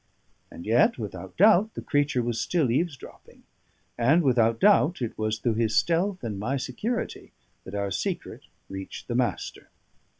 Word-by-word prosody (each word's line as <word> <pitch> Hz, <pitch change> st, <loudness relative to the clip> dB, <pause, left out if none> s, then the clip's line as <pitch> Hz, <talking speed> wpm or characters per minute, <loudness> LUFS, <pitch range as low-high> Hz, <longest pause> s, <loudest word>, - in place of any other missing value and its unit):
And 85 Hz, -, -10 dB
yet 115 Hz, +3 st, +3 dB
without 95 Hz, -5 st, -7 dB
doubt 215 Hz, +2 st, +5 dB
the -, -, -5 dB
creature 145 Hz, -4 st, +1 dB
was 120 Hz, -1 st, -2 dB
still 155 Hz, -9 st, +1 dB
eavesdropping; 145 Hz, +1 st, -4 dB, 0.6 s
and 145 Hz, +9 st, +4 dB
without 115 Hz, -4 st, +3 dB
doubt 190 Hz, -4 st, +4 dB
it 120 Hz, -3 st, -3 dB
was 110 Hz, 0 st, -1 dB
through 115 Hz, +1 st, 0 dB
his 110 Hz, -1 st, 0 dB
stealth 180 Hz, +2 st, +1 dB
and 105 Hz, -4 st, -4 dB
my 125 Hz, +7 st, -1 dB
security 215 Hz, -, -4 dB, 0.3 s
that 95 Hz, -, -7 dB
our 100 Hz, -1 st, -2 dB
secret -, -, -4 dB, 0.3 s
reached 95 Hz, 0 st, -8 dB
the 120 Hz, -, -3 dB
Master. 120 Hz, 0 st, -2 dB
120 Hz, 155 wpm, -26 LUFS, 110-165 Hz, 0.6 s, doubt